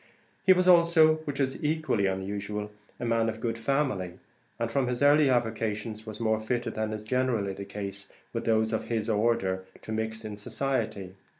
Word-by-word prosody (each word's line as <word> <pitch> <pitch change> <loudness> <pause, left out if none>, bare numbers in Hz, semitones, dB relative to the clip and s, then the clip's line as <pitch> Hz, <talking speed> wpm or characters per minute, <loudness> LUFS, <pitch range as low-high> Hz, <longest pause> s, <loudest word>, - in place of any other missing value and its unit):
He 190 - +6
was, 185 0 +4
also, 170 -3 +6
which 145 -1 -4
is 135 +1 -1
equally 150 -10 +1
unusual, 105 +2 -3 0.3
a - - -3
man 115 -1 +2
of 110 0 -5
good 115 0 -2
family, 115 -8 0 0.4
and 115 0 -2
from 135 0 +1
his 125 +1 -1
early 145 0 +6
avocations 110 -2 -1
was 110 -1 -7
more 110 -1 +1
fitted 120 +2 -2
than 110 0 -2
is 110 0 -5
generally 115 -4 0
the 100 +1 -7
case 100 0 -7 0.2
with 115 -1 -3
those 110 0 +2
of 110 - -1
his 115 -1 -1
order, 105 -4 +1 0.2
to - - -7
mix 110 0 -3
in 105 -1 -6
society. 110 -5 -2
110 Hz, 180 wpm, -28 LUFS, 105-130 Hz, 0.4 s, He